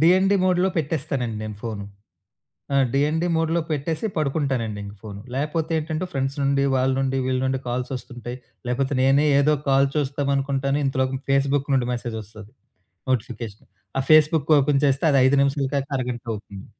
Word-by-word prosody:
DND 185 +4 +5
మోడ్‌లో 185 0 +3
పెట్టేస్తానండి 140 -7 -2
నేను 105 -1 -6
phone. 110 -3 -4 0.9
ఆ! - - +1 0.2
డిఎన్‌డి 155 +5 +1
మోడ్‌లో 165 +1 +1
పెట్టేసి 155 +6 -1
పడుకుంటానండి 135 -8 -1
ఇంక 100 +1 -8
ఫోను. 100 -2 -8
లేపోతే 150 +4 -1
ఏంటంటే, 155 +2 -3
ఫ్రెండ్స్ 135 +1 -2
నుండి, 140 0 +2
వాళ్ళ 130 0 +2
నుండి, 135 0 0
వీళ్ళ 130 0 0
నుండి, 130 0 0
కాల్సొస్తుంటాయి. 125 -1 -5 0.3
లేకపోతే 135 +3 0
నేనే 135 +3 +4
ఏదో 150 +2 +4
కాల్ 135 0 +4
చూస్తామనుకుంటాను, 140 -1 0
ఇంతలోకి 130 0 0
ఫేస్‌బుక్ 140 +1 +2
నుండి 125 -2 +1
మెసేజొస్తది. 110 -3 -6 0.6
నోటిఫికేషన్. 115 -3 -3 0.3
ఆ - - +3
ఫేస్‌బుక్ 155 -1 +5
ఓపెన్ 140 0 +2
చేస్తే 140 +2 +2
అది 140 - +4
5 135 +2 +4
నిమిషాల 140 0 +1
కాక 140 0 -1
అరగంట 125 -2 -3
అవుతుంది. 100 -2 -9
135 Hz, 145 wpm, -23 LUFS, 125-150 Hz, 0.9 s, డిఎన్‌డి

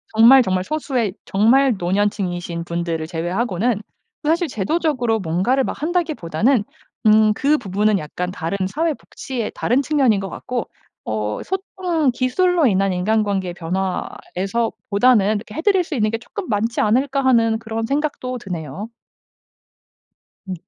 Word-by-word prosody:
정말 235 +4 +8
정말 185 -5 0
소수의 255 -6 -1
정말 240 +6 +4
노년층이신 180 -2 -1
분들을 170 -1 -3
제외하고는. 190 +6 -1 0.4
그 300 - 0
사실 340 +2 +2
제도적으로 245 - 0
뭔가를 190 +10 +1
막 - - -5
한다기보다는 280 - +1 0.4
음 215 0 +6
그 290 +5 +2
부분은 205 -1 +1
약간 180 +3 -4
다른 175 +1 -3
사회복지의 265 - -3
다른 250 +4 +1
측면인 265 -7 +2
것 195 0 -5
같고 245 +4 -4 0.4
어 105 -1 -2
소통 360 -6 -1
기술로 320 +8 +2
인한 195 -2 +2
인간관계의 195 -1 0
변화에서 190 +4 -2 0.2
보다는 210 -1 +4
'해 315 - -3
드릴 385 0 +3
수 340 - -7
있는 215 -4 +1
게 225 - -1
쪼끔 365 - -8
많지 225 +2 0
않을까.' 270 +5 +1
하는 230 -4 +3
그런 225 0 -3
생각도 275 -2 -2
드네요. 180 - -6 1.6
음. 190 - -3
220 Hz, 310 characters per minute, -20 LUFS, 190-270 Hz, 1.6 s, 정말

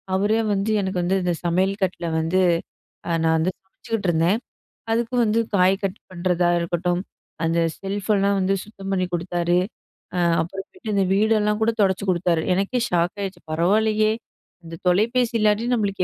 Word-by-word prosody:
அவரே 210 +3 +2
வந்து 200 +2 0
எனக்கு 190 0 -2
வந்து 190 +2 +1
இந்த 180 -1 +1
சமையல் 190 +4 +1
கட்டுல 180 -2 -2
வந்து, 165 +4 +1 0.7
அ - - -3
நான் 160 0 +3
வந்து 170 +4 +1
சமச்சிக்கிட்ருந்தேன் 190 -1 -1 0.5
அதுக்கு 235 +2 0
வந்து 220 +1 +2 0.2
காய் 185 0 +4
கட் 195 +1 -2
பண்ணுறதா 180 -1 +1
இருக்கட்டும், 175 +1 -1 0.4
அந்த 165 +1 +1 0.2
செல்ஃபெல்லாம் 200 0 0
வந்து 190 +1 +1
சுத்தம் 195 -2 -8
பண்ணி 185 -1 +1
குடுத்தாரு, 175 0 +1 0.6
அ - - 0 0.2
அப்றமேட்டு 195 - -6
இந்த 195 -1 +3
வீடெல்லாம் 210 +1 +2
கூட 225 - +3
தொடச்சு 190 0 +1
குடுத்தாரு. 170 -2 +1
எனக்கே 200 +6 0
ஷாக் 175 +1 +1
ஆயிடுச்சு 190 -3 -5
பரவாயில்லையே, 215 +6 +2 0.5
இந்த 165 - -8
தொலைபேசி 230 +6 +2
இல்லாட்டி 215 +2 +2
நம்மளுக்கு 200 -4 0
190 Hz, 145 wpm, -23 LUFS, 175-210 Hz, 0.7 s, காய்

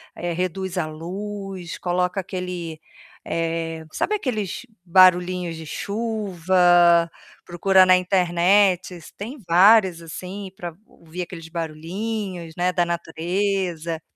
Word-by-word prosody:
eh, 175 -1 -3
reduz 185 +1 -3
a 155 - -1
luz, 190 +2 -6
coloca 180 +2 -1
aquele 180 -4 -5 0.5
eh, 165 -1 -3
sabe 425 - -1
aqueles 245 - -3 0.2
barulhinhos 180 -1 +4
de 160 - -8
chuva? 180 -4 +2 0.4
Procura 185 +2 +4
na 185 0 +6
internet, 180 0 +2 0.2
tem 235 +9 -6
vários, 185 0 +5
assim, 185 +4 -7
pra 175 -2 -6
ouvir 170 +2 -9
aqueles 165 -2 -9
barulhinhos, 175 +2 -5
né, 180 +1 +1
da 175 - +2
natureza. 170 0 -2
180 Hz, 105 wpm, -23 LUFS, 170-195 Hz, 0.5 s, na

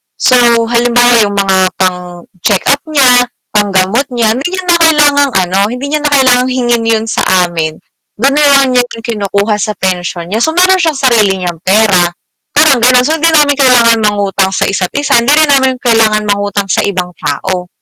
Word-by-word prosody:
so 255 -1 +2 0.2
halimbawa 240 +1 +1 0.2
yung 200 - -6
mga 195 -1 0 0.2
pang-check-up 180 +6 -2
niya, 250 -5 +3 0.2
panggamot 205 +5 0
niya, 230 -2 +1
hindi 260 +8 -3
niya 370 - -5
na 350 -1 +1
kailangang 290 -3 +2 0.2
ano, 190 +2 -1
hindi 250 +5 -6
niya 305 - -1
na 295 -1 -2
kailangang 255 -1 +2
hingin 240 -2 -1
'yun 225 -1 0
sa - - -1 0.2
amin. 160 -2 -4 0.4
Do'n 265 +6 0
nalang 280 -3 +3
niya 250 -1 +2
rin 230 - -12
kinukuha 210 -1 -2
sa 215 -1 -3
pensyon 175 -2 -4
niya 220 - -1
so 320 +7 -1
mayro'n 370 +1 +3
siyang 325 -3 0
sarili 230 -7 +2
niyang 175 -3 -5
pera, 190 -2 +2 0.5
parang 295 -3 +3
gano'n. 250 +1 +3
So 315 +4 -1
'di 330 - +1
namin 295 -3 +2
kailangan 235 -3 +3
mangutang 200 -2 -1
sa - - -1
isa't-isa, 220 +9 0
hindi 240 +5 +2
rin 310 -1 +2
namin 265 -2 +2
kailangan 225 -3 +1
mangutang 205 -1 -2
sa - - 0
ibang 180 -3 -4
tao. 180 +4 -4
230 Hz, 175 wpm, -10 LUFS, 195-275 Hz, 0.5 s, niya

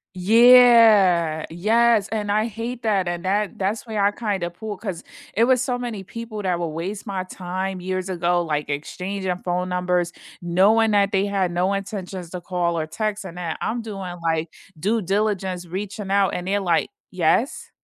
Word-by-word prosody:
Yeah, 215 -6 +6
yes, 220 +4 +2
and 210 -2 -3
I 215 +2 +1
hate 230 +2 -6
that, 200 -5 +1
and 175 0 -3
that 205 +2 -1
that's 205 +5 -2
where 215 -2 -1
I 200 - +4
kinda 205 -5 -2
pull 210 +4 -7
'cause 190 -4 -6 0.3
it 230 +2 +3
was 255 -1 +3
so 250 -1 -1
many 235 -5 -5
people 225 +1 -7
that 180 -3 -1
would 170 - -1
waste 185 +7 -5
my 190 -2 -2
time 185 +1 -4
years 185 +1 -3
ago, 175 -1 +1
like 150 -3 -2
exchanging 180 +5 -3
phone 180 +1 -1
numbers, 180 -1 0 0.3
knowing 200 +6 +3
that 200 -1 +2
they 195 +1 +2
had 195 -3 0
no 180 +3 +1
intentions 195 -3 -5
to 180 - -6
call 175 -1 -1
or 155 - -1
text, 210 +5 -3
and 175 -2 -9
that 170 -3 -4
I'm 230 +1 -2
doing, 195 -5 -6
like, 165 0 -1 0.3
due 210 +8 0
diligence, 190 -2 -1
reaching 195 +2 -5
out, 200 -1 +3
and 180 - -4
they're, 200 +2 0
like, 175 -4 +1 0.2
"Yes?" 185 - 0
190 Hz, 180 wpm, -22 LUFS, 175-215 Hz, 0.3 s, Yeah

